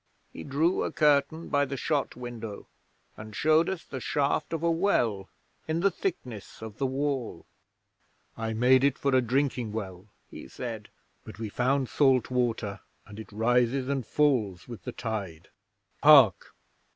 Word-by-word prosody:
He - - -8
drew 155 +6 +1
a - - -2
curtain 150 +2 +2
by 145 -1 +2
the 140 0 -5
shot 145 0 -1
window 115 -4 -7 0.5
and 105 0 -10
showed 155 +2 +3
us 190 -3 -4
the 130 - -6
shaft 140 +4 -1
of 165 -1 -3
a 170 - +3
well 120 - 0 0.4
in 160 +1 -1
the 200 +1 +3
thickness 120 - -5
of 110 -2 -9
the 135 - +1
wall. 135 -2 -3 0.9
'"I 110 0 -3
made 125 +3 +4
it 140 -1 +2
for 140 -1 0
a 130 - +5
drinking 125 -2 -1
well," 95 -3 -6 0.2
he - - -10
said, 110 - -7 0.3
"but - - -11
we 110 -1 -5
found 130 +4 0
salt 130 -3 +2
water, 115 -5 -1 0.3
and 105 +1 -11
it 110 - -10
rises 120 +4 +1
and 135 -2 -1
falls 115 -10 0
with 120 -3 -10
the 125 - -4
tide. 100 -10 -5 0.5
Hark!" 135 - +6
125 Hz, 160 wpm, -28 LUFS, 110-145 Hz, 0.9 s, Hark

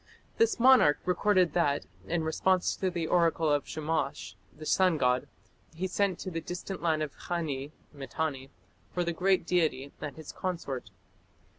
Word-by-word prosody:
This 455 - +3
monarch 240 - +6
recorded 180 -2 +3
that, 145 -5 +1 0.2
in 165 -1 0
response 180 +3 +1
to 190 - -1
the 170 -2 -2
oracle 165 -2 +2
of 145 -1 +1
Shamash, 155 -8 -2 0.2
the 155 +9 -11
sun 185 0 +3
god, 125 -2 +1 0.5
he 180 +3 -2
sent 190 -1 0
to 185 - -5
the 165 -1 -3
distant 180 +3 -6
land 160 -2 +1
of 150 - -6
Khani 150 -6 -3 0.2
(Mitanni) 135 0 -4 0.4
for 180 - -1
the 170 0 -1
great 185 +1 +2
deity 155 -6 0
and 145 -3 -5
his 160 -2 -9
consort. 165 - -4
165 Hz, 155 wpm, -29 LUFS, 145-180 Hz, 0.5 s, monarch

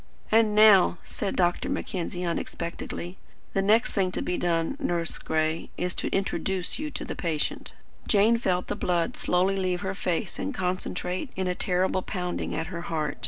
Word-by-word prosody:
"And 220 -1 +4
now," 210 -4 +7
said 200 -3 -3
Dr. 175 -1 +1
Mackenzie 180 -1 -3
unexpectedly, 170 +1 -4 0.4
"the 195 - +2
next 215 +4 +4
thing 190 -3 +1
to - - -2
be 180 - -1
done, 165 +5 0
Nurse 175 - -1
Gray, 160 0 -1
is 180 +1 -1
to - - -2
introduce 190 0 -1
you 305 0 -3
to - - -6
the - - -5
patient." 160 -4 -2 0.3
Jane 215 +3 +5
felt 180 -5 +1
the 205 - -3
blood 175 -4 0
slowly 185 +2 +2
leave 180 -2 0
her 190 -1 -2
face 185 0 -2
and 280 - -3
concentrate 185 +3 -2
in 190 - -1
a 180 - +1
terrible 185 +1 +1
pounding 180 -1 -3
at 160 - -1
her 170 - -3
heart. 155 -3 -2
180 Hz, 170 wpm, -27 LUFS, 175-195 Hz, 0.4 s, now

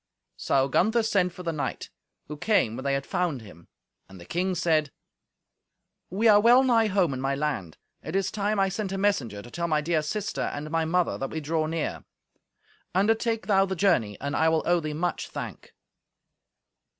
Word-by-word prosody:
So 135 -1 +1
Gunther 220 - +2
sent 195 -5 +1
for 180 +1 -10
the 170 - -1
knight, 150 - -4 0.3
who 150 - -7
came 145 - +1
when 130 - -6
they 140 0 +1
had 140 - -3
found 165 -9 -2
him. 85 -5 -15 0.4
And 95 -1 -12
the 85 - -12
king 185 - -1
said, 160 -4 +1 1.2
"We 210 +6 +1
are 210 -1 +7
well 240 +4 +6
nigh 230 -4 +3
home 185 -7 +1
in 130 - -4
my 135 +1 0
land. 135 - -3 0.2
It 160 - -6
is 195 -1 0
time 210 0 -1
I 195 - +3
sent 195 +1 -3
a 195 - -2
messenger 165 - 0
to 120 - -12
tell 170 +4 -2
my 155 -2 +2
dear 155 +1 0
sister 205 +7 -3
and 150 +1 -4
my 165 0 +1
mother 175 +2 0
that 135 - -3
we 160 - -4
draw 155 +1 -1
near. 165 -1 -3 0.9
Undertake 225 +3 +1
thou 195 -2 +3
the 190 - -2
journey, 160 - +1
and 140 0 -3
I 160 - +3
will 160 0 +1
owe 175 0 +3
thee 155 -2 -4
much 175 +3 -2
thank." - - -7
170 Hz, 195 wpm, -26 LUFS, 145-195 Hz, 1.2 s, are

